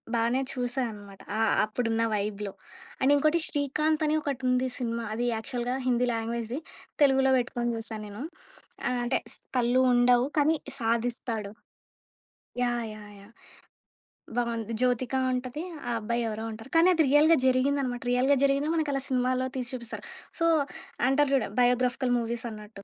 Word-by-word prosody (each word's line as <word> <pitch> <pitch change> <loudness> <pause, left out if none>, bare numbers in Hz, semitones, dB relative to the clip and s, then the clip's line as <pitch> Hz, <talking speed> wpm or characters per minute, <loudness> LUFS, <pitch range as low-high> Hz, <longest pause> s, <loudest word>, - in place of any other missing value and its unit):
బానే 235 +3 +2
చూసా 250 0 -2
అన్నమాట. 205 -2 -12 0.2
అ - - -1 0.3
అప్పుడున్న 225 +1 -1
వైబ్‌లో. 205 -1 -3 0.5
అండ్ 270 +2 +4
ఇంకోటి 310 +4 +3
'శ్రీకాంత్' 305 +2 0
అని 305 - +2
ఒకటి 275 -3 -3
ఉంది 250 +1 +2
సినిమా 235 -1 -2
అది 240 +2 -1
యాక్చువల్‌గా 245 +2 -3
హిందీ 250 0 +2
లాంగ్వేజ్‌ది, 230 +3 -3 0.4
తెలుగుల 265 -1 +4
వెట్టుకొని 240 0 -1
జుసా 225 -1 -5
నేను. 210 +6 -7 0.6
ఆహ్, 250 0 0
అంటే 240 - +1 0.2
స్ - - -12 0.2
కళ్ళు 245 +1 +3
ఉండవు, 245 0 +4
కానీ 305 +2 +4 0.2
సాధిస్తాడు. 230 -2 -1 1.1
యాహ్! 240 -1 0
యాహ్! 210 -1 -11
యాహ్! 200 +3 -16 1.1
బావుంది. 230 -2 -1
జ్యోతిక 250 0 +1 0.2
ఉంటది. 255 +4 -3 0.3
ఆ - - 0
అబ్బాయి 235 +2 -1
ఎవరో 220 0 -4
ఉంటరు. 225 +3 -10
కానీ 330 +2 +6
అది 325 -2 +3
రియల్‌గా 305 +3 +6
జరిగిందన్నమాట. 255 -1 +1
రియల్‌గా 260 +3 +4
జరిగిందో 280 +2 +2
మనకలా 290 -4 0
సినిమాలో 255 0 +1
తీసి 255 0 -3
జూపిస్తారు. 235 -2 -6 0.4
సో, 335 - +2 0.6
అంటారు 290 +1 +3
జూడు, 270 - +2
బయోగ్రాఫికల్ 250 +1 +2
మూవీస్ 235 0 -3
అన్నట్టు. 210 -2 -11
245 Hz, 140 wpm, -28 LUFS, 230-270 Hz, 1.1 s, కానీ